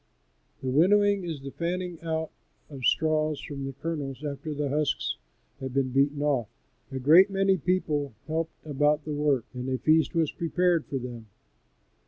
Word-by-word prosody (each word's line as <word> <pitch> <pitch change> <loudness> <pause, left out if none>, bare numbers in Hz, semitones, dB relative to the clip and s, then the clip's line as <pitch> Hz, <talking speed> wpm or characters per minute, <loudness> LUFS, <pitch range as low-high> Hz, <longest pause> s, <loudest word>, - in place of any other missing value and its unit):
The - - -3
winnowing 200 +6 +4
is 160 -5 -5
the 135 - -6
fanning 175 +1 -3
out 160 -1 -2 0.4
of 140 - -7
the - - -10
straws 155 -1 +2
from 140 -2 -6
the 135 - -5
kernels 140 -2 -4
after 145 +1 -4
the 145 0 -2
husks 150 +2 0 0.4
have 130 -1 -6
been 135 -1 +2
beaten 140 +2 +2
off. 135 -7 +1 0.4
A 135 - -3
great 160 +9 +6
many 195 0 +2
people 150 -7 -1
helped 160 +2 -4
about 150 0 +1
the 155 - -3
work, 145 -5 +1
and 125 +1 -4
a 130 - 0
feast 160 +5 +3
was 165 -3 +2
prepared 175 -1 +1
for 135 - -2
them. 120 -3 -7
150 Hz, 170 wpm, -27 LUFS, 135-165 Hz, 0.4 s, great